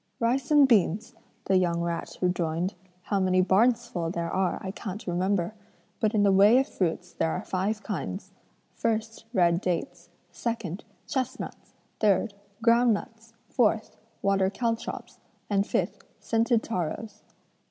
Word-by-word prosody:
'Rice 255 +3 +1
and 295 -2 +7
beans,' 220 +1 +2 0.3
the 190 - +3
young 175 -2 +1
rat 170 -1 -3
rejoined, 180 0 0 0.3
'how 200 - 0
many 185 -1 +3
barns 230 +6 +4
full 175 -8 -3
there 170 -1 -3
are, 185 -1 +1
I 190 - -3
can't 205 0 -6
remember; 180 +1 0 0.5
but 220 0 +1
in 205 - +4
the 200 - +5
way 200 +5 +7
of 270 - +3
fruits 180 0 -2
there 165 - 0
are - - -2
five 205 +4 -2
kinds: 150 - -4 0.4
1st, 225 0 -2
red 175 -5 +3
dates; 180 +8 -3 0.2
2nd, 220 -6 -3 0.3
chestnuts; 260 0 -4 0.2
3rd, 210 +1 +3 0.3
ground 235 -1 +5
nuts; 225 +2 -9 0.2
4th, 220 -3 +2 0.3
water 195 -1 +3
caltrops, 230 +2 -3 0.3
and 200 0 +3
5th, - - -1 0.2
scented 230 0 +1
taros.' 205 +2 -4
200 Hz, 140 wpm, -27 LUFS, 180-230 Hz, 0.5 s, and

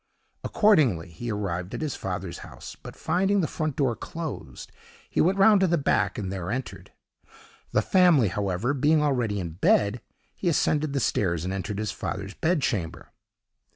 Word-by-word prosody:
Accordingly 135 - +3
he 120 +8 -5
arrived 95 -3 -3
at - - -5
his 155 -3 -2
father's 90 -2 -5
house, - - -10
but, - - -11
finding 190 +5 +1
the 160 - 0
front 155 -4 -3
door 130 -5 +1
closed, 155 - -7 0.4
he - - 0
went 185 +4 +2
round 200 +1 +6
to 190 - +4
the 170 0 +2
back 105 -8 +1
and 95 -3 -3
there 90 -2 -4
entered. 105 -7 -5 0.8
The 105 - +2
family, 175 - +4
however, 100 +6 -1
being 150 +3 +3
already 120 -8 0
in 85 -3 -4
bed, 100 +6 +2 0.3
he 180 - -1
ascended 155 -2 +1
the 140 - +1
stairs 85 - 0
and 95 - -2
entered 100 +2 -4
his 105 -1 -2
father's 100 0 -5
bed 160 - 0
chamber. 95 -12 -3
115 Hz, 170 wpm, -26 LUFS, 95-155 Hz, 0.8 s, round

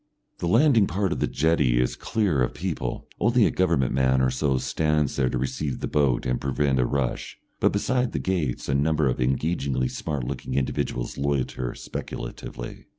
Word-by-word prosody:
The 85 - -2
landing 115 - +5
part 95 0 -1
of - - -1
the - - +1
jetty 70 -5 +2
is 60 - +1
clear 95 - 0
of 60 - 0
people, - - -3
only 120 0 +4
a - - +2
government 85 -9 +1
man 65 0 +3
or 65 -1 +2
so 65 +1 +1
stands 75 +3 0
there 65 -2 +2
to - - -1
receive 65 +2 -2
the - - -3
boat 70 -5 +1
and 60 0 -1
prevent 70 0 +1
a 60 - +3
rush, 65 -2 -2 0.2
but - - +3
beyond 125 +4 0
the - - -2
gates 85 -10 -1
a 70 - 0
number 75 +1 +2
of 65 0 -1
engagingly 65 -1 0
smart 75 -5 -3
looking 65 +1 -4
individuals 65 -2 -2
loiter 65 -3 -1
speculatively. - - -7
70 Hz, 180 wpm, -25 LUFS, 65-85 Hz, 0.2 s, landing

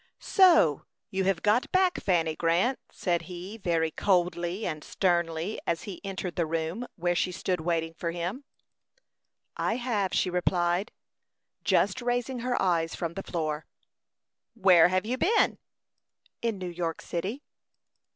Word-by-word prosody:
"So 335 - +4 0.2
you 190 0 0
have 190 -3 +1
got 215 +4 +2
back, 370 -1 +3
Fanny 165 -4 +1
Grant," 175 +12 +1
said 175 -2 -1
he, 180 +4 -7
very 165 -4 0
coldly 175 +1 0
and 155 -1 -3
sternly, 170 +1 0
as 170 0 0
he 195 -4 -7
entered 190 -2 -5
the 170 -2 +1
room 165 +9 -2
where 175 -1 0
she 180 +1 0
stood 180 -1 -2
waiting 165 -1 -1
for 170 0 -3
him. 175 +10 -4 1.1
"I 225 - 0
have," 225 -6 -1
she 185 - +1
replied, 180 +2 +1 0.7
just 260 - +2
raising 245 +1 -1
her 245 +1 -1
eyes 170 -3 +1
from 170 -1 -3
the 195 - -4
floor. 155 -4 -3 0.9
"Where 185 -6 +6
have 185 +2 0
you 250 +3 -2
been?" 440 +5 +3 0.8
"In 230 -3 -1
New 185 -1 -4
York 170 -1 -3
city." 195 - -4
180 Hz, 140 wpm, -28 LUFS, 170-215 Hz, 1.1 s, Where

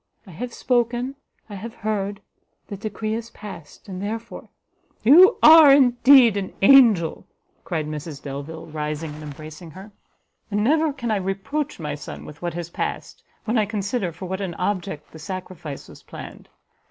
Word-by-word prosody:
I 190 - -13
have 240 +9 -6
spoken, 240 +1 0 0.3
I 210 - -11
have 220 +4 -8
heard, 205 -2 -3 0.4
the 200 - -7
decree 215 +1 -4
is 230 +1 -5
past, 200 -6 -11
and 185 -1 -6
therefore," 225 +3 -6 0.5
"You 350 - +7
are 315 -2 +9
indeed 255 -3 +6
an 195 -2 -4
angel!" 210 -9 +5 0.4
cried 160 -4 -3
Mrs 150 -1 -6
Delvile, 145 +3 -7
rising 150 0 -5
and 150 - -10
embracing 155 +2 -10
her; 190 +6 -12 0.6
"and 205 0 0
never 310 +5 +2
can 245 -5 -4
I 215 - +2
reproach 195 +11 -3
my 150 -2 -4
son 145 - -8
with 150 +1 -12
what 175 -1 -4
has 170 -1 -6
passed, - - -5 0.2
when 230 +1 +1
I 210 - +1
consider 200 -2 -2
for 180 +3 -9
what 190 +2 -4
an 180 -4 -4
object 180 -5 -3
the 160 - -12
sacrifice 180 -4 -7
was - - -14
planned. - - -11
195 Hz, 165 wpm, -23 LUFS, 165-235 Hz, 0.6 s, are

